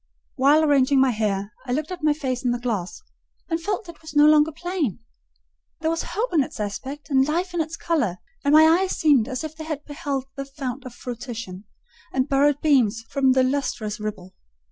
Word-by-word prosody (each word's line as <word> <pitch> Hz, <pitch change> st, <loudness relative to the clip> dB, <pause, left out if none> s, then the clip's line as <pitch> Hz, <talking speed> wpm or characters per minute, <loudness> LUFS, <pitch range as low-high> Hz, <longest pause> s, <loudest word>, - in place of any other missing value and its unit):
While 285 Hz, +4 st, +4 dB
arranging 280 Hz, -2 st, +4 dB
my 265 Hz, -1 st, +4 dB
hair, 205 Hz, -2 st, -2 dB
I 245 Hz, -, -1 dB
looked 305 Hz, +5 st, -2 dB
at 360 Hz, -2 st, -6 dB
my 305 Hz, -, +4 dB
face 265 Hz, -4 st, -3 dB
in 250 Hz, -, +1 dB
the 240 Hz, -, +1 dB
glass, 230 Hz, -, -4 dB, 0.5 s
and 330 Hz, -1 st, -1 dB
felt 405 Hz, +2 st, -3 dB
it 340 Hz, -, -12 dB
was 315 Hz, -1 st, -11 dB
no 295 Hz, 0 st, +7 dB
longer 305 Hz, +1 st, +5 dB
plain: 330 Hz, -, -2 dB, 0.8 s
there 320 Hz, 0 st, +1 dB
was 330 Hz, -, -1 dB
hope 420 Hz, +5 st, -3 dB
in 315 Hz, -, +4 dB
its 260 Hz, -, -5 dB
aspect 265 Hz, +9 st, -5 dB
and 265 Hz, 0 st, +4 dB
life 350 Hz, +4 st, -1 dB
in 345 Hz, -, +1 dB
its 315 Hz, +1 st, -4 dB
colour; 260 Hz, -, 0 dB, 0.3 s
and 285 Hz, -, +2 dB
my 310 Hz, +1 st, +8 dB
eyes 360 Hz, +4 st, +3 dB
seemed 280 Hz, -8 st, +4 dB
as 260 Hz, +2 st, -4 dB
if 315 Hz, 0 st, -6 dB
they 315 Hz, -, -7 dB
had 305 Hz, -2 st, -5 dB
beheld 285 Hz, -3 st, -3 dB
the 275 Hz, -, -4 dB
fount 270 Hz, -2 st, -6 dB
of 250 Hz, -1 st, -9 dB
fruition, 230 Hz, -6 st, -7 dB, 0.5 s
and 260 Hz, +1 st, 0 dB
borrowed 285 Hz, +1 st, +2 dB
beams 240 Hz, -7 st, +3 dB
from 270 Hz, -2 st, +3 dB
the 260 Hz, 0 st, +4 dB
lustrous 255 Hz, -6 st, -2 dB
ripple. 195 Hz, -3 st, -6 dB
280 Hz, 205 wpm, -23 LUFS, 245-315 Hz, 0.8 s, my